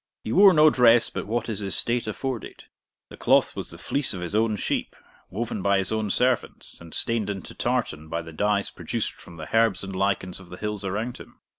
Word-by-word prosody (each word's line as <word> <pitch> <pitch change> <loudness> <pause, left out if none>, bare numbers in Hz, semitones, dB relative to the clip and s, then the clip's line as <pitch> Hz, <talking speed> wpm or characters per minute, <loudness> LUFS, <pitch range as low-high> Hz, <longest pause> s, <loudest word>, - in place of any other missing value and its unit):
He 110 - -4
wore 195 - +8
no 155 -2 +6
dress 120 -2 +5
but - - -5
what 120 +2 -1
his 110 -2 -2
estate 115 +4 0
afforded; 120 +2 -5 0.5
the - - -11
cloth - - +3
was - - -5
the - - -8
fleece 140 -7 -1
of 90 - -6
his 90 +2 -5
own 110 0 +2
sheep, - - -2 0.3
woven 105 +1 -3
by 100 +1 +3
his 95 +1 0
own 110 -1 -1
servants, 125 +3 -1
and 85 -1 -12
stained 115 +1 -1
into 95 -3 -6
tartan 80 0 -2
by 85 +1 -3
the 80 -1 -10
dyes 105 +3 0
produced - - -3
from 85 - -14
the 80 +7 -6
herbs 115 -4 +3
and 95 -1 -6
lichens 95 -1 -1
of 95 -2 -14
the 90 - -9
hills 105 -1 -4
around 110 +6 -3
him. - - -14
105 Hz, 210 wpm, -25 LUFS, 95-115 Hz, 0.5 s, wore